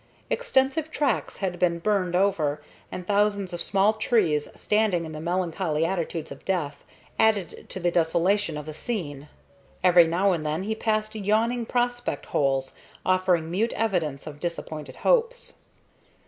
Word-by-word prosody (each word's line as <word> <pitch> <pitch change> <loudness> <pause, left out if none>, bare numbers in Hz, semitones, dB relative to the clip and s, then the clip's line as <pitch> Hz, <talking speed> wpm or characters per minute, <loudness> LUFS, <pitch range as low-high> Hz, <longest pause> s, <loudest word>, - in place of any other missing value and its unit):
Extensive 315 - +1
tracts 295 -3 -1
had 180 -3 -3
been 170 -2 +2
burned 185 -1 0
over, 170 -7 +1 0.3
and 180 - -6
thousands 205 -2 +1
of 170 - -4
small 195 +3 +3
trees, 210 -9 +1
standing 210 -5 +1
in 160 - -7
the 155 0 -6
melancholy 170 -2 0
attitudes 170 -3 -3
of - - -10
death, 150 -7 -2 0.4
added 210 -6 +1
to - - -5
the 175 -1 +1
desolation 170 +1 +2
of 150 - -6
the 155 - -6
scene. 150 - -5 0.5
Every 175 -2 +7
now 185 +4 +2
and 165 -4 -1
then 155 +4 -1
he 220 +2 -1
passed 215 -1 -1
yawning 220 +3 0
prospect 245 - -1
holes, 135 -2 0 0.3
offering 185 -3 +2
mute 220 +6 0
evidence 170 -11 -1
of 150 -1 -8
disappointed 155 -4 -5
hopes. - - +1
185 Hz, 145 wpm, -26 LUFS, 160-215 Hz, 0.5 s, Every